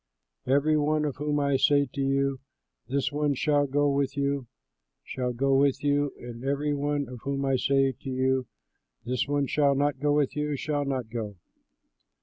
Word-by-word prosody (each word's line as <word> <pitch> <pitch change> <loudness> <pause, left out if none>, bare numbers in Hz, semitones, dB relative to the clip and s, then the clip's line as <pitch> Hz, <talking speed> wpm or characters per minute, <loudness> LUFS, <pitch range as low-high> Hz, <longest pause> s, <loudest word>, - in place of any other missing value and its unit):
Every 145 +3 +3
one 150 +1 +1
of 145 - -3
whom 150 +1 0
I 140 -1 +2
say 145 +1 +4
to 140 - -3
you, 135 0 +1 0.5
'This 140 +2 -1
one 145 -1 0
shall 145 +1 +2
go 145 +2 +2
with 140 0 0
you,' 140 -2 -1 0.6
shall 125 -1 -3
go 135 +3 +1
with 140 0 +2
you; 145 -1 +2
and 120 0 -9
every 140 +2 0
one 145 -1 -1
of 125 0 -9
whom 140 0 -2
I 135 -1 +2
say 135 +1 +2
to 135 +1 -9
you, 130 -1 0 0.6
'This 125 +2 -1
one 145 0 +1
shall 140 0 +2
not 145 -1 0
go 145 +1 +1
with 145 -2 +1
you,' 150 0 -1
shall 145 +1 -2
not 130 -5 -3
go." 110 -4 -4
140 Hz, 180 wpm, -27 LUFS, 130-145 Hz, 0.6 s, say